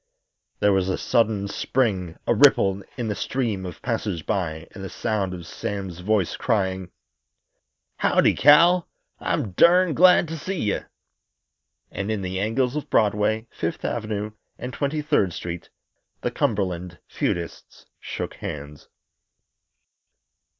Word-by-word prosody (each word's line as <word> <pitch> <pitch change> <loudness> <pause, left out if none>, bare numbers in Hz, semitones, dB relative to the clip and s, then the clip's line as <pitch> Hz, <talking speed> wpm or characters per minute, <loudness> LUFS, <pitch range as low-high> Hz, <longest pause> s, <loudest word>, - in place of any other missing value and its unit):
There 105 -1 +4
was 95 -1 +1
a 95 - 0
sudden 110 -3 +1
spring, 100 -6 -1
a - - +3
ripple 95 0 +5 0.2
in 120 -3 -2
the 105 - 0
stream 105 -5 -2
of 90 - -10
passers 105 - -2
by 80 -4 -2
and 95 - -8
the 95 - -5
sound 100 -4 -1
of 90 -2 -7
Sam's 95 0 -5
voice 100 -1 +1
crying: 95 -5 0 1.1
"Howdy, - - +3
Cal! 170 +5 +6 0.3
I'm 130 - -1
durned 175 - +5
glad 180 -1 +6
to 165 0 -5
see 190 +3 -3
ye." 105 -6 0 1.1
And 100 +2 -4
in 105 -3 -1
the 95 0 -3
angles 120 +6 0
of 150 - -4
Broadway, 105 +1 +2
Fifth - - -4
Avenue 105 0 -2 0.3
and 125 0 -6
Twenty 150 +3 -1
third 145 - +2
Street 85 0 -6 0.5
the - - -1
Cumberland 90 -5 -1
feudists 85 -1 -4
shook - - -5
hands. 75 0 -7
105 Hz, 130 wpm, -24 LUFS, 95-125 Hz, 1.1 s, Cal